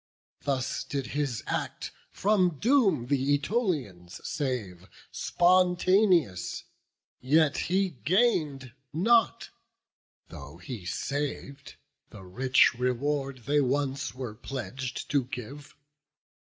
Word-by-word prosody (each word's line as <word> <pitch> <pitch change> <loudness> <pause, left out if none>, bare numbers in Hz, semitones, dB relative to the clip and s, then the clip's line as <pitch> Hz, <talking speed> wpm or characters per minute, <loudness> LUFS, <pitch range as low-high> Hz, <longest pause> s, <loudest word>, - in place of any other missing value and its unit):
Thus 135 -3 -1
did 140 -2 -4
his 140 -5 -3
act - - -4 0.2
from 185 -6 +1
doom 205 - +3
th' - - -12
Ætolians 140 - 0
save 115 - -4 0.2
Spontaneous; 180 - +2 0.6
yet 150 +3 +3
he 190 +1 +2
gain'd 155 - +1 0.2
not, 220 +8 +2 0.8
though 70 +3 -10
he 95 +2 -8
sav'd, 140 +2 -4 0.3
The 95 - -12
rich 125 +9 +3
reward 130 +1 -2
they 145 +1 +3
once 140 +1 -1
were 125 -4 -5
pledg'd 130 +2 -6
to 140 -4 +2
give. 135 +4 -8
140 Hz, 95 wpm, -28 LUFS, 125-170 Hz, 0.8 s, doom